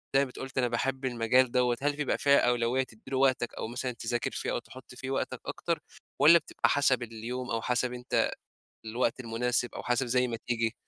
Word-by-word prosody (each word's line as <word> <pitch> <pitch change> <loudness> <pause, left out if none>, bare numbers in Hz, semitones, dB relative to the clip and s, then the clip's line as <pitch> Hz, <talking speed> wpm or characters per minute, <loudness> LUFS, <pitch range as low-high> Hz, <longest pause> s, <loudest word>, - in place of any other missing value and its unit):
زي - - +7
ما 140 - +3
بت - - -11
قُلت 135 0 -7
أنا 125 -1 +3
باحب 130 +3 -1
المجال 120 +1 +3
دوّة، 125 -1 +2
هل 145 0 +1
بيبقى 145 -1 0
فيها 140 0 +5
أولوية 120 +1 +2
تدّي 110 -4 -16
له 130 - 0
وقتك 130 -3 +2
أو - - -4
مثلًا 125 +2 -3
تذاكر 120 0 -2
فيه - - -3
أو - - 0
تحُط 130 -1 -13
فيه 130 +1 -6
وقتك 135 - -2
أكتر، - - -2 0.4
والّا 165 +3 +9
بتبقى - - 0
حسب 135 -3 +3
اليوم 120 +2 -5
أو 115 0 0
حسب 125 0 0
أنت 125 0 0 0.5
الوقت 115 +2 -1
المناسب 120 +1 -1
أو - - -5
حسب 125 +1 0
زي 125 +1 +2
ما 115 - -3
تيجي؟ 115 -1 0
125 Hz, 210 wpm, -29 LUFS, 120-130 Hz, 0.5 s, والّا